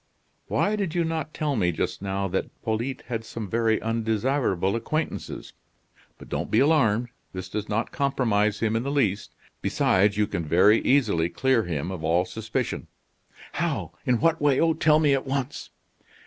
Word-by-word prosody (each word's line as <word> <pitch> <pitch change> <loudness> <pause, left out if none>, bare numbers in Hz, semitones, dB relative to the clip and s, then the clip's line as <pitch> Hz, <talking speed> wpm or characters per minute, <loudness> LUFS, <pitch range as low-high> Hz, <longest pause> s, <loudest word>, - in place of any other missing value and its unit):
"Why, 210 +1 +1
did 195 -6 -2
you 170 - +2
not 160 -2 -3
tell 150 -3 -1
me 90 -6 +2
just 80 - -3
now 95 0 -2
that 95 - -1 0.2
Polyte 115 +4 -2
had 115 -2 -4
some 110 -1 -6
very 110 +1 +1
undesirable 115 -3 0
acquaintances? 155 +7 -3 0.6
But - - -13
don't - - -3
be 110 - +2
alarmed; 125 -6 +3 0.2
this 95 -1 -5
does 105 0 -4
not 110 +2 -1
compromise 110 -7 +1
him 110 -1 +1
in 115 - +1
the 135 - -3
least. 105 -9 0 0.3
Besides, 100 +2 +2
you 105 - +3
can 85 -5 -3
very 90 +8 +5
easily 105 -12 +2
clear 125 +4 +1
him 85 0 -3
of 90 -4 -6
all 85 +3 +2
suspicion." 110 +4 -3 0.6
"How? - - -2
In 125 -2 +2
what 165 0 +2
way? 145 -2 +3
Oh, 165 0 +3
tell 155 -1 +4
me 150 -3 +3
at 135 0 -1
once." 135 0 -3
115 Hz, 170 wpm, -25 LUFS, 100-140 Hz, 0.6 s, very